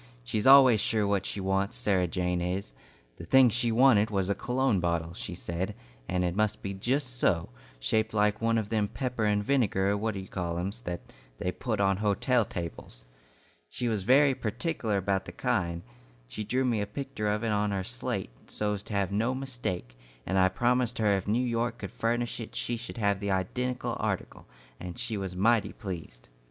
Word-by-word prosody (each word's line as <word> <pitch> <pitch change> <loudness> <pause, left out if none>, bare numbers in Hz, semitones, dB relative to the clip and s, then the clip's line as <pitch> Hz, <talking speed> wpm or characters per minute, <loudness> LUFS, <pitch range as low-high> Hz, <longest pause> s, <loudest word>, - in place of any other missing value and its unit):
She's 105 - -1
always 130 -5 +8
sure 110 -2 +1
what 100 -1 0
she - - -3
wants, 95 +1 0
Sarah 95 -3 +1
Jane 90 0 -1
is. 90 -5 -3 0.4
The - - -9
thing 130 +8 +6
she 120 +1 0
wanted 115 -3 +5
was 95 -2 0
a - - +3
cologne 125 -2 +1
bottle, 85 -1 -1
she 90 - -6
said, 90 +3 -4 0.3
and 90 0 +1
it 90 0 -1
must 105 0 0
be 100 - -3
just 125 +5 -1
so, 85 - +2 0.3
shaped 110 - +1
like 105 0 +1
one 115 0 +2
of 105 -2 -2
them 110 -2 +1
pepper 125 0 -2
and 105 -1 +2
vinegar 100 -6 +2
what 110 +1 -2
d' 95 - -4
you 95 - -10
call 85 -3 -3
em's, 100 +7 -3
that 90 -7 -4 0.4
they - - -1
put - - -3
on 95 -1 +3
hotel 110 +4 +2
tables. 85 - -7 0.6
She 120 - -2
was 110 -3 0
very 135 +7 +5
pertikeler 115 - -2
about 95 0 0
the - - -7
kind. 90 -9 -1 0.4
She - - -5
drew 130 +5 0
me 115 -4 +1
a 100 - -2
picter 130 -1 -4
of 105 +2 0
it 115 - 0
on 105 0 +1
her 100 -2 -1
slate, - - -4 0.2
so 105 0 -1
's 100 - -6
to 105 - -8
have 100 -1 +1
no 115 +6 +1
mistake, 120 - -4 0.3
and 95 +1 +1
I 95 0 +5
promised 120 +4 +1
her 105 -3 +3
if 95 0 -3
New 120 +5 +2
York 115 0 -1
could 100 - -7
furnish 120 +1 -1
it 115 - -7
she 120 - -1
should 120 +1 -7
have 100 -3 +1
that 100 0 -3
identical 125 +7 -1
article, - - -3 0.3
and 90 -1 -7
she 110 - -2
was 95 -3 -4
mighty 110 +4 +2
pleased." 85 - -7
105 Hz, 200 wpm, -29 LUFS, 95-120 Hz, 0.6 s, always